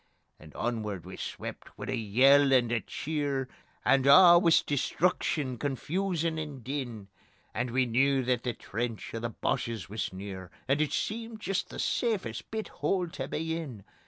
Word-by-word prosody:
And 75 -1 -14
onward 105 -7 -3
we - - -8
swept - - -7
wi' - - -6
a - - 0
yell 135 +6 +5
and 120 -3 +4
a 120 - +2
cheer, 140 +2 -2 0.4
And 135 0 +4
a' 175 +3 +9
wis 165 -2 +5
destruction, 145 -3 0
confusion 165 - -1
and 145 -5 -6
din, 120 -7 -5 0.4
And 120 +2 -1
we 130 +2 +2
knew 135 +3 +2
that 125 -1 +1
the 125 -1 -2
trench 115 +1 -4
o' 115 - -3
the 115 +1 -3
Boches 115 -4 -2
wis 110 +2 -3
near, 95 -1 -7 0.2
And 140 +3 +2
it 155 - 0
seemed 225 0 -3
jist 195 -2 -2
the - - -8
safest 225 -5 -1
bit 220 -1 -4
hole 180 -3 -1
tae 135 -4 -5
be 160 +3 -2
in. 135 -12 -6
135 Hz, 165 wpm, -29 LUFS, 115-160 Hz, 0.4 s, a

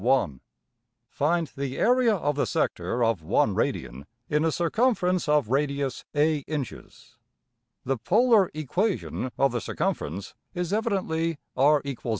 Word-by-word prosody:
(1) 115 - +1 0.7
Find 165 +1 0
the 135 -1 -4
area 245 -2 +4
of 145 -5 -1
the 145 - 0
sector 120 0 -1
of 115 -6 +1
$1$~radian 70 -3 0 0.2
in 150 +1 +1
a 165 - +2
circumference 180 - +1
of 150 -7 +3
radius 140 0 -1
$a$~\DPchg{inch}{inches}. 150 -2 -2 0.7
The 135 0 0
polar 215 - +4
equation 165 - -1
of 135 -1 +3
the 120 -1 -2
circumference 95 -1 -3 0.2
is 180 +1 -2
evidently 175 -7 0 0.2
$r=a$. 140 0 +3
150 Hz, 120 wpm, -26 LUFS, 135-180 Hz, 0.7 s, area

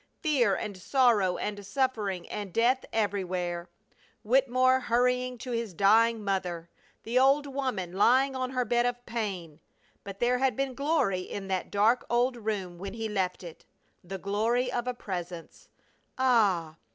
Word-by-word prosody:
Fear 255 - +3
and 210 0 -5
sorrow 210 -3 +2
and 205 -1 -4
suffering 205 -5 -1
and 205 -2 -5
death 245 +6 +2
everywhere! 185 -4 -2 0.5
Wittemore 255 +2 +3
hurrying 250 +1 +1
to 250 +2 -7
his 230 -6 -3
dying 220 +4 +4
mother! 180 -4 -3 0.3
The 240 +3 +1
old 275 +2 +4
woman 260 -11 -3
lying 260 +7 +3
on 255 -1 -2
her 255 -1 -1
bed 240 +1 +2
of 245 0 -4
pain! 185 -9 -4 0.4
But 200 0 -8
there 245 +1 +2
had 265 -3 +1
been 270 0 -2
glory 275 - +1
in 195 +1 -7
that 190 -1 -2
dark 220 +5 +3
old 245 +2 +2
room 205 -6 -4
when 195 +2 -6
he 225 -1 -3
left 190 -3 -2
it, 170 -2 -10 0.4
the 190 +2 -6
glory 225 +6 0
of 240 0 -2
a 250 - -2
Presence! 175 -6 -7 0.5
Ah! 200 -11 +2
225 Hz, 150 wpm, -28 LUFS, 190-250 Hz, 0.5 s, dying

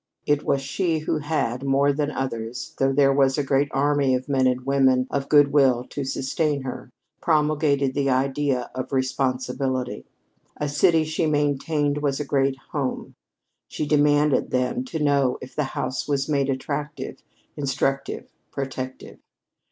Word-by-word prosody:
It 145 0 +2
was 135 - 0
she 165 +4 0
who 155 0 -1
had, 145 -5 -1
more 140 +1 +2
than 145 +1 -1
others, 120 -4 -4
though 135 0 +3
there 135 0 +4
was 135 0 +3
a 145 - +1
great 135 +1 +2
army 140 -1 +2
of 125 +2 -4
men 135 -2 +2
and 125 0 -1
women 135 -2 +3
of 140 -1 -2
good 145 -2 +6
will 130 -4 +4
to 145 - -3
sustain 140 +2 -1
her, 130 -2 -6 0.3
promulgated 150 -4 +2
this 140 0 0
idea 135 0 0
of 130 0 -5
responsibility. 130 - -1 0.5
A 150 - -2
city, 160 +2 +3
she 155 +1 -1
maintained, 145 0 0
was 145 -1 -1
a 150 - -2
great 135 -1 +1
home. 140 -4 -3 0.5
She - - -3
demanded, 145 -1 +3
then, 125 - 0
to 245 - -5
know 140 -4 +2
if 130 - -11
the 150 - 0
house 130 - -2
was 140 -2 0
made 140 -2 +1
attractive, 140 +2 -4 0.3
instructive, 135 0 -2 0.2
protective. 130 -1 -6
140 Hz, 150 wpm, -24 LUFS, 130-145 Hz, 0.5 s, good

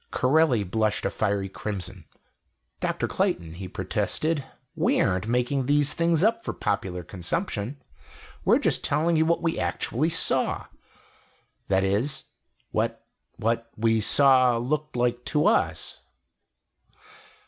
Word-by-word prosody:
Corelli 130 -4 +3
blushed 110 +2 -1
a - - 0
fiery 100 -2 -1
crimson. 100 0 -5 0.7
"Dr. - - -1
Clayton," 85 -2 -1
he 95 +2 -7
protested, 155 - -1 0.3
"we - - +2
aren't 90 +3 +1
making 125 +2 0
these 145 0 +3
things 170 0 +2
up 230 +2 +2
for - - -3
popular 95 -3 -2
consumption. 105 - -3 0.6
We're - - +5
just - - 0
telling 160 +4 +1
you 160 0 +3
what 170 +1 +1
we 165 -1 0
actually 150 +8 -1
saw - - +1 1.0
that 95 0 +2
is 105 +9 0 0.5
what - - -1 0.3
what 115 +1 -1
we 110 0 +2
saw 130 0 +5
looked 150 +5 -2
like 120 0 0
to 150 +1 +1
us." 220 - +1
120 Hz, 125 wpm, -26 LUFS, 100-150 Hz, 1.0 s, We're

